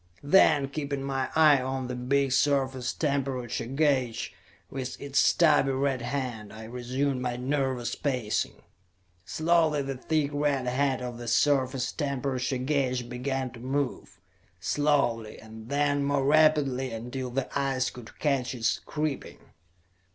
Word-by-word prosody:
Then, 145 -2 +5
keeping 140 -1 -4
my 135 -1 -2
eye 150 -4 +6
on 130 0 -3
the 125 - -4
big 135 +2 +1
surface 135 -2 +1
temperature 135 -6 -2
gauge, 135 -4 0 0.4
with 130 -1 -5
its 140 0 0
stubby 145 -5 +4
red 135 -1 0
hand, 120 -4 -4
I 110 +1 -9
resumed 125 +3 -2
my 125 -1 -2
nervous 130 -1 -1
pacing. 125 -7 -2 0.6
Slowly 160 - +2
the 135 0 -3
thick 145 +2 0
red 145 -3 0
hand 130 +1 0
of 120 -1 -5
the 120 - -7
surface 130 +1 +2
temperature 135 -3 -2
gauge 130 -2 -1
began 130 +1 -2
to 115 - -12
move; 130 -7 -3 0.4
slowly, 120 - +1
and 110 +1 -11
then 145 0 +1
more 140 -1 +1
rapidly, 145 -3 +3
until 125 +3 -5
the 130 +2 -2
eyes 135 -2 0
could 120 -2 -12
catch 135 -4 0
its 120 0 0
creeping. 150 -2 -4
135 Hz, 135 wpm, -28 LUFS, 125-140 Hz, 0.6 s, eye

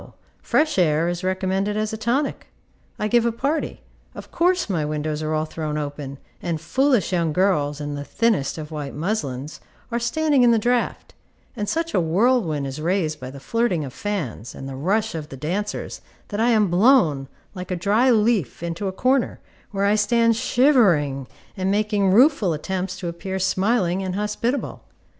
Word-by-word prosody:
fresh 305 -9 +1
air 160 -1 +3
is 175 +1 -3
recommended 190 +2 -1
as 215 0 -1
a - - -1
tonic. 240 +6 -1 0.5
I 210 - -1
give 235 +2 +3
a 235 - +1
party; 280 +7 -2 0.3
of - - -10
course 360 +1 +2
my 175 -7 -1
windows 150 0 -2
are 155 0 -1
all 155 0 0
thrown 155 -1 -4
open, 145 -2 -5 0.2
and 170 -3 -2
foolish 245 - +1
young 165 -3 +1
girls, 150 -6 +1
in 145 -1 -4
the 145 0 -4
thinnest 210 -6 0
of 155 0 -7
white 145 -3 -5
muslins, 150 -5 -3 0.3
are 235 - 0
standing 285 +4 +2
in 245 - +6
the 230 - +5
draught; 240 +2 -1 0.4
and 210 -3 -3
such 330 0 -1
a - - +3
whirlwind 170 - +2
is 135 +3 -5
raised 165 -2 0
by 130 - -7
the 140 +1 -10
flirting 185 - 0
of 130 - -8
fans, 155 - -4
and 135 - -7
the 135 - -6
rush 205 +10 0
of 155 -2 -6
the 135 - -8
dancers, 185 +9 -3 0.3
that 205 - -3
I 235 +2 +3
am 215 -6 +3
blown, 175 - +4 0.3
like 180 -2 -7
a 180 - -1
dry 210 +8 +2
leaf, 215 - +2
into 170 +4 -3
a - - -1
corner, 255 +6 +1 0.3
where 200 -1 -1
I 200 - +4
stand 230 +2 +3
shivering, 200 - +3 0.3
and 190 0 -1
making 205 -1 +1
rueful 225 - +4
attempts 185 +4 -3
to 175 - -3
appear 190 +3 -4
smiling 190 0 +1
and 185 -1 -3
hospitable. 210 +6 -2
190 Hz, 180 wpm, -23 LUFS, 155-230 Hz, 0.5 s, in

